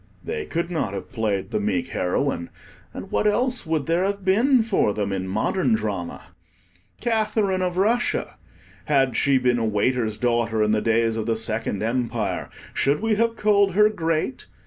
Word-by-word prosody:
They 450 -2 -4
could 170 +1 -2
not 130 - -2
have 95 - -7
played 110 -5 -2
the - - 0
meek 100 -4 -1
heroine, 90 -1 -1 0.4
and - - -9
what 210 - +1
else 245 0 0
would 160 -3 0
there 170 +2 +1
have 200 0 -2
been 235 +6 +4
for 195 - +1
them 100 -2 -2
in 95 -1 -3
modern 110 - +1
drama? 100 -6 -4 0.7
Catherine 215 -4 0
of 180 -1 -1
Russia! 225 +6 0 0.5
had 135 -4 +2
she 140 -1 +3
been 125 -1 +2
a 115 - 0
waiter's 110 +1 0
daughter 115 -2 +1
in 105 - +2
the 110 0 +2
days 115 0 +1
of 110 0 -3
the 115 - +1
Second 110 -2 -2
Empire, 115 -5 -2 0.2
should 140 +2 +1
we 225 0 +1
have 230 +2 +1
called 205 -3 +3
her 210 +2 +5
Great? 165 +3 -2
130 Hz, 170 wpm, -23 LUFS, -, 0.7 s, her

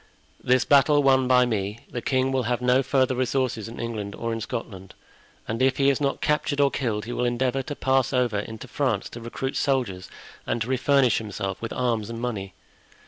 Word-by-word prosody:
This 125 0 +3
battle 145 +1 +5
won 130 -1 +4
by 125 -1 +5
me, 105 -1 -2
the 120 - -4
king 130 +1 +1
will 130 -1 +1
have 125 - 0
no 125 +1 +3
further 130 -1 +1
resources 130 -3 -1
in 115 - -9
England 110 -4 -4
or 115 0 -3
in 115 - -4
Scotland; 95 -4 -6 0.5
and 115 +3 -3
if 130 0 +3
he 140 0 +4
is 140 - -2
not 140 -1 -1
captured 150 -1 0
or 140 -1 +4
killed, 110 -6 -2
he 120 - -5
will 125 - -1
endeavor 125 +2 0
to 145 +2 -6
pass 130 -1 +1
over 125 -5 +1
into 110 +1 -7
France 125 -8 -1
to 120 - -9
recruit 125 +3 -4
soldiers 120 -10 -1 0.4
and - - 0
to - - -8
refurnish 130 0 +3
himself 100 -3 -5
with 115 - -4
arms 115 -4 -1
and 115 0 -5
money. 100 -6 -4
125 Hz, 200 wpm, -25 LUFS, 115-135 Hz, 0.5 s, battle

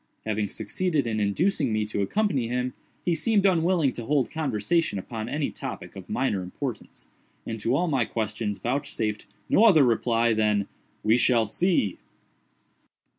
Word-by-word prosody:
Having 110 -1 -1
succeeded 160 - -1
in 110 -2 -1
inducing 135 - +1
me 110 0 0
to 105 -1 -2
accompany 140 - 0
him, 125 +1 -2 0.3
he 175 - +2
seemed 200 +4 +1
unwilling 170 -6 +3
to 120 - -6
hold 140 -4 +1
conversation 145 -2 0
upon 110 +3 -5
any 145 +2 -1
topic - - -7
of 95 -2 -10
minor 120 -7 0
importance, 110 +6 -6 0.4
and 110 0 -4
to 115 +5 +1
all 175 +4 +1
my 135 -6 +2
questions 110 -2 -3
vouchsafed 120 -5 -2 0.2
no 215 - +4
other 170 -10 +7
reply 115 -1 +2
than 105 -2 +1 0.4
"we 110 +2 +4
shall 120 -2 +3
see!" 110 - 0
120 Hz, 150 wpm, -26 LUFS, 110-155 Hz, 0.4 s, other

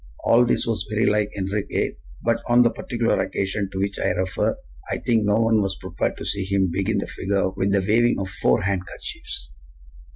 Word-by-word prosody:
All 120 +1 +5
this - - +2
was 105 -4 -1
very 110 +1 +1
like 105 0 +2
Enriquez; 100 +1 -1 0.3
but 115 0 +1
on 120 +1 +6
the 120 - +3
particular 120 -1 -1
occasion 100 0 -1
to 95 - -6
which 100 0 -2
I - - +1
refer, 95 0 -1 0.3
I - - -1
think 115 -3 +1
no 105 0 +3
one 115 -1 +3
was 95 -1 -1
prepared 90 -2 -3
to - - -7
see 100 -1 0
him 95 -1 +1
begin 100 +3 0
the 100 - -1
figure 95 -1 -1
with 95 +1 -1
the 100 -1 +3
waving 120 +3 +3
of 95 - -2
FOUR 95 - +2
handkerchiefs! 90 -9 -3
100 Hz, 195 wpm, -23 LUFS, 95-110 Hz, 0.3 s, on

